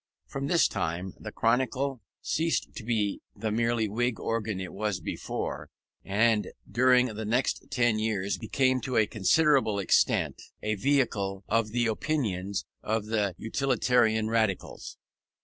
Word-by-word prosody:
From 135 0 -4
this 170 +2 +4
time 90 +3 -3
the - - -7
Chronicle 130 +2 0 0.2
ceased 165 +1 0
to 120 - -7
be 110 -3 -1
the 110 +1 -3
merely 115 0 +1
Whig 115 0 -1
organ 110 -3 -2
it 95 - -6
was 105 -2 -2
before, 80 - -4 0.3
and 110 +1 +2 0.2
during 125 0 +4
the 110 -3 -5
next 120 +5 0
ten 120 -3 +2
years 100 -3 -1
became 130 +4 +1
to 130 +2 -2
a 110 - +5
considerable 125 +2 +3
extent 100 - +2 0.2
a 110 - 0
vehicle 105 -5 0
of 115 -1 +1
the 120 +2 0
opinions 110 -6 -1 0.2
of 110 0 -1
the 105 -4 0
Utilitarian 115 -2 +1
Radicals. 110 -4 -1
110 Hz, 135 wpm, -28 LUFS, 105-125 Hz, 0.3 s, a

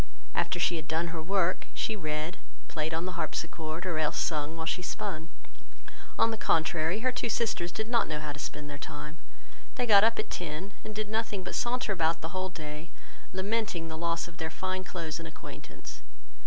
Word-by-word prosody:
After - - +2
she 175 - +4
had 155 -1 -5
done 165 +2 +1
her 165 -1 -3
work, 185 +1 +2
she 220 - +1
read, 155 -1 -2 0.3
played 155 0 -1
on 165 +2 0
the 185 - -1
harpsichord, 165 -1 -2
or 170 -4 +1
else 155 -1 +2
sung 155 0 +1
whilst 160 0 +1
she 180 - -3
spun. 170 -3 -2 0.9
On 230 - +6
the 220 - -2
contrary, 160 +4 +3
her 255 +1 +4
two 245 -1 -1
sisters 215 -6 +1
did 220 +3 -2
not 235 0 +4
know 155 -1 -1
how 150 -1 -3
to 145 - -8
spend 150 0 -4
their 145 -1 -6
time; 150 +1 -6 0.6
they 250 - +2
got 205 -3 +9
up 230 +1 +5
at - - -2
ten, 175 +4 -3
and 215 - -6
did 215 0 0
nothing 220 -2 0
but 180 - -4
saunter 240 -4 +2
about 165 -2 +3
the 160 - -2
whole 185 +1 -1
day, 155 -1 -6 0.4
lamenting 190 -3 0
the 160 - -3
loss 165 +1 +1
of 170 -1 -12
their 160 0 -1
fine 185 +3 -1
clothes 170 -3 -3
and 165 - -5
acquaintance. 160 - -9
170 Hz, 200 wpm, -31 LUFS, 160-200 Hz, 0.9 s, got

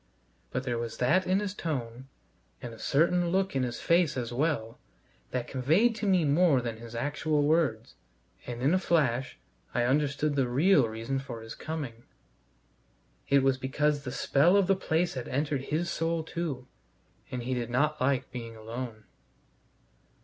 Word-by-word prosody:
But 130 - -3
there 120 -2 -2
was 115 -1 -5
that 175 +10 +2
in 185 +2 +3
his 205 -2 -3
tone, 130 - -4 0.5
and 120 -2 -7
a 115 - -12
certain 170 +4 +2
look 190 -2 0
in 135 - +2
his 120 -1 -2
face 170 -4 +3
as 120 -1 -3
well, 120 -5 -1 0.5
that 125 -1 -3
conveyed 160 - +3
to 215 - -2
me 185 -4 +3
more 150 -1 +4
than 120 -2 -4
his 115 0 -10
actual 145 +3 0
words, 145 -8 +1 0.5
and 120 0 -5
in 145 +5 +4
a 185 - +3
flash 135 -8 +1 0.4
I 120 - +2
understood 145 +3 +1
the 135 -3 +2
real 140 +2 +4
reason 115 +5 -3
for 120 -4 -7
his 110 - -8
coming. 140 -8 -6 1.2
It 140 -1 +5
was 135 -1 +2
because 145 +2 0
the 125 - -5
spell 165 +11 +3
of 200 - +4
the 195 +1 +3
place 175 -1 0
had 130 -3 -5
entered 140 0 -1
his 160 +3 -1
soul 165 0 -1
too, 155 -6 -4 0.6
and 125 -1 -4
he 130 +2 -2
did 120 -2 -2
not 150 +5 +1
like 130 -1 +1
being 115 -2 -7
alone. 110 0 -7
140 Hz, 170 wpm, -29 LUFS, 120-160 Hz, 1.2 s, It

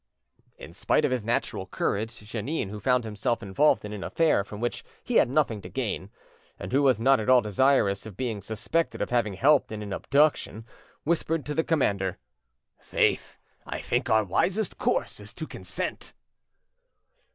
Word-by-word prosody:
In - - -11
spite - - +1
of - - 0
his 125 -4 -1
natural 105 -4 -2
courage, 110 +4 -2
Jeannin, 110 +3 -3
who 105 +1 -6
found 125 +3 +2
himself 110 +2 -2
involved 105 +7 +2
in 105 - -6
an 100 -2 -6
affair 160 -11 +2
from 105 +1 -9
which 120 +1 -3 0.2
he 245 - +1
had 120 - +4
nothing 130 -7 +1
to - - -9
gain, 110 -7 -3 0.5
and 90 - -7
who 140 - +3
was 130 -5 +3
not 135 +3 +4
at 110 - -2
all 130 -1 +7
desirous 105 -2 +2
of 100 -4 -11
being 115 -6 -3
suspected 115 - -2
of - - -2
having 115 -5 +1
helped 140 +7 +3
in 105 -1 -5
an 100 -1 -5
abduction, 140 -4 +1 0.4
whispered 165 -1 0
to 150 - -3
the 160 - +1
commander— 100 - 0 0.6
"Faith! - - 0 0.3
I - - -5
think - - -1
our 110 0 +4
wisest 185 - 0
course - - 0
is - - -12
to - - -5
consent." - - -5
115 Hz, 175 wpm, -27 LUFS, 105-140 Hz, 0.6 s, all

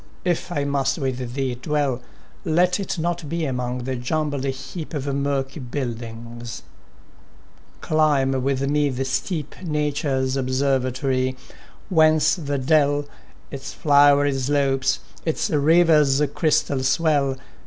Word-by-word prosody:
if 175 0 -1
I 145 -5 -1
must 140 +1 0
with 130 -4 -3
thee 135 -2 -1
dwell, 135 0 -1 0.4
Let 180 +4 +2
it 195 -1 -3
not 170 -2 -2
be 165 0 -1
among 125 -2 -3
the 130 +1 -2
jumbled 145 +2 -2
heap 145 +5 -5
Of 140 -2 -3
murky 140 0 -2
buildings; 120 -3 -6 1.2
climb 150 -4 +2
with 135 +1 0
me 145 0 +2
the 135 0 -2
steep, 150 +3 -2
— - - -11
Nature's 145 -4 -1
observatory, 130 -1 0 0.3
— - - -26
whence 155 -3 +4
the 145 -5 -2
dell, 145 +1 +2 0.5
Its 135 -1 -7
flowery 145 -1 +5
slopes, 135 0 +1 0.2
its 160 - -1
river's 150 -2 +4
crystal 145 -3 +1
swell. 140 -1 +1
140 Hz, 120 wpm, -23 LUFS, 130-155 Hz, 1.2 s, flowery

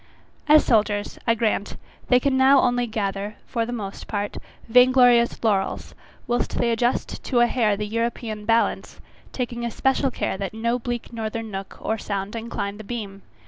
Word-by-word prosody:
As 305 0 +6
soldiers, 210 -2 +1
I 230 - +4
grant, 215 -3 -1 0.3
they 250 - +5
can 270 +1 +1
now 265 +1 +6
only 245 0 +1
gather, 205 -1 -3
for 230 -2 -2
the - - -4
most 205 -5 -6
part, 205 -1 -3 0.3
vainglorious 245 -1 +5
laurels, 200 -4 0 0.3
whilst 240 0 -1
they 235 - +2
adjust 240 +2 -1
to 245 - +1
a 240 - +6
hair 220 -4 +1
the 210 - -3
European 225 -1 -3
balance, 230 +1 0 0.3
taking 240 -2 -4
especial 265 +3 +1
care 235 - -3
that 195 +1 -4
no 235 +2 0
bleak 240 0 -5
northern 225 0 -4
nook 195 0 -7
or 220 0 -2
sound 200 +1 -4
incline 220 -3 -4
the 215 - -9
beam. 200 -3 -6
230 Hz, 165 wpm, -23 LUFS, 210-245 Hz, 0.3 s, As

